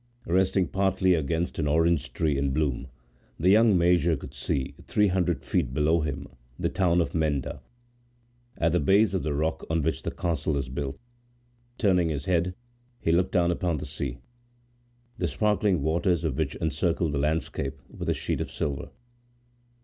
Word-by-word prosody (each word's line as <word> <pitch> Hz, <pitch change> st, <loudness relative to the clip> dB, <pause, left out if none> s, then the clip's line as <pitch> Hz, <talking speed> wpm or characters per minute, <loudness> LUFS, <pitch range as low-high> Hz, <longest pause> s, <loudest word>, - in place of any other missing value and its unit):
Resting 95 Hz, +1 st, +2 dB
partly 95 Hz, -1 st, +2 dB
against 80 Hz, +2 st, -1 dB
an 75 Hz, -, 0 dB
orange 80 Hz, 0 st, +2 dB
tree 75 Hz, -3 st, 0 dB
in 70 Hz, 0 st, 0 dB
bloom, 70 Hz, -2 st, -1 dB, 0.5 s
the 90 Hz, +4 st, +4 dB
young 110 Hz, -1 st, +5 dB
major 85 Hz, -2 st, +3 dB
could -, -, -10 dB
see, 65 Hz, -2 st, -2 dB
three 105 Hz, -1 st, +3 dB
hundred 90 Hz, -6 st, 0 dB
feet 70 Hz, -9 st, -1 dB
below 80 Hz, +3 st, +3 dB
him, 70 Hz, -2 st, -3 dB, 0.3 s
the -, -, 0 dB
town 90 Hz, -2 st, +2 dB
of 75 Hz, -4 st, -2 dB
Menda, 75 Hz, -4 st, -1 dB, 1.0 s
at 85 Hz, -, +2 dB
the 90 Hz, -, +2 dB
base 100 Hz, +7 st, +4 dB
of 95 Hz, -, 0 dB
the 75 Hz, -2 st, -2 dB
rock 80 Hz, +2 st, -1 dB
on 80 Hz, -2 st, +1 dB
which 80 Hz, -, -1 dB
the -, -, -3 dB
castle 80 Hz, -3 st, -1 dB
is 65 Hz, -2 st, -3 dB
built. 65 Hz, +1 st, -4 dB, 0.8 s
Turning 90 Hz, -6 st, +3 dB
his 70 Hz, -3 st, -3 dB
head, 90 Hz, 0 st, +1 dB, 0.4 s
he 80 Hz, -, 0 dB
looked 90 Hz, +2 st, +2 dB
down 85 Hz, -2 st, +3 dB
upon 85 Hz, -2 st, -1 dB
the -, -, -5 dB
sea, 70 Hz, -3 st, -4 dB, 1.0 s
the 90 Hz, -, +1 dB
sparkling 100 Hz, +1 st, +1 dB
waters 85 Hz, +2 st, +1 dB
of 80 Hz, -6 st, -1 dB
which -, -, -1 dB
encircled 80 Hz, +1 st, 0 dB
the 70 Hz, -, -1 dB
landscape 70 Hz, -2 st, -1 dB
with -, -, -6 dB
a -, -, +2 dB
sheet -, -, -2 dB
of -, -, -3 dB
silver. 70 Hz, -3 st, -3 dB
80 Hz, 170 wpm, -27 LUFS, 75-90 Hz, 1.0 s, young